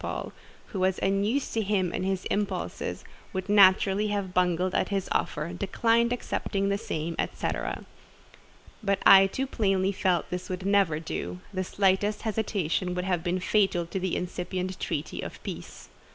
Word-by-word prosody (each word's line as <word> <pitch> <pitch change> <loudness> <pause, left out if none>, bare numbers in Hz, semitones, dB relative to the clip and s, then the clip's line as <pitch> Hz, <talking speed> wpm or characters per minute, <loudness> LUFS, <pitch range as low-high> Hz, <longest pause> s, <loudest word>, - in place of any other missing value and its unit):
Paul, - - -4 0.4
who 200 - -4
was 185 0 +2
unused 200 +8 +1
to 225 - +1
him 195 -4 0
and - - -2
his 190 -1 -1
impulses, 205 0 -2 0.3
would 190 0 -3
naturally 200 0 +5
have 200 -3 -2
bungled 180 0 +1
at - - +1
this 195 -2 -1
offer—declined 200 +9 +1
accepting 200 -4 -1
the 200 - +1
same—et 160 -1 -3
cetera. - - -3 1.0
But 200 -2 +1
I 195 0 +9
too 265 +7 -2
plainly 195 -6 +1
felt 185 -3 +1
this 180 0 -4
would 185 0 -4
never 195 -6 +3
do: 90 - -5
the 185 0 -1
slightest 195 +2 +1
hesitation 200 -5 -1
would 180 0 -2
have 180 -3 0
been 180 +1 0
fatal 190 -3 +2
to 190 +3 -4
the 185 -1 -1
incipient 180 +1 -3
treaty 150 +1 -3
of - - -7
peace. - - -8
190 Hz, 155 wpm, -27 LUFS, 180-200 Hz, 1.0 s, I